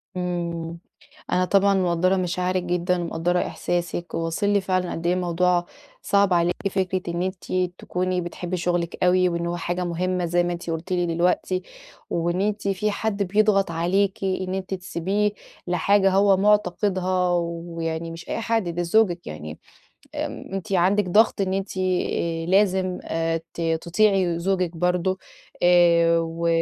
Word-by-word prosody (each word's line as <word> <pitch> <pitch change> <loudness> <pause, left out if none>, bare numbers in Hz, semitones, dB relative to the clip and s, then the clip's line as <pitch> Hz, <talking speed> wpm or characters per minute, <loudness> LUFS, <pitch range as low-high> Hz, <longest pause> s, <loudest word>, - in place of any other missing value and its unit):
امم، 170 -2 -3 0.5
أنا 185 - +3
طبعًا 200 +1 +3
مقدرة 185 0 +2
مشاعرِك 180 0 -1
جدًا 180 0 0
ومقدرة 170 +2 0
إحساسِك، 175 -1 -3
وواصل 165 +5 -1
لي 205 -1 +3
فعلًا 185 -1 -1
قد 165 +1 -4
إيه 180 - +3
الموضوع 180 0 +1 0.4
صعب 200 -1 +3
عليكِ 175 0 +2 0.2
فكرة 185 -1 -1
إن 170 +1 -2
أنتِ 185 0 -5 0.3
تكوني 185 0 -1
بتحبي 175 +1 -4
شغلك 175 0 -1
أوي 180 0 +4
وإن 170 0 -2
هو 175 0 -2
حاجة 175 +1 -2
مهمة 180 +1 -1
زي 175 +1 +2
ما 175 - -1
أنتِ 170 -1 -5
قلتِ 165 +3 -4
لي 175 -1 +1
دلوقتي، 180 +2 0 0.5
وإن 175 +2 0
أنتِ 205 0 -1
في 200 +2 0
حد 205 -1 -1
بيضغط 195 -1 +2
عليكِ 190 +4 0
إن 185 0 -1
أنتِ 190 0 -3
تسيبيه 190 +3 -1 0.4
لحاجة 195 +3 +3
هو 195 0 +4
معتقدها، 190 -3 +1
ويعني 165 -1 -4
مش 165 +1 -9
أي - - -2
حد 225 -4 0
ده 170 +1 -2
زوجك 175 -1 +2
يعني 75 0 -7 0.6
آآ - - -1 0.3
أنتِ 195 -1 -5
عندك 190 +3 +3
ضغط 210 +1 +4
إن 190 -1 0
أنتِ 195 0 -3
آآ 170 -3 -1
لازم 185 0 +2 0.6
ت 170 - -6 0.2
تطيعي 185 -1 +2
زوجك 180 -1 0
برضه 180 +2 +1 0.5
آآ، 170 -1 +5
و 165 +1 -2
180 Hz, 150 wpm, -24 LUFS, 170-190 Hz, 0.6 s, آآ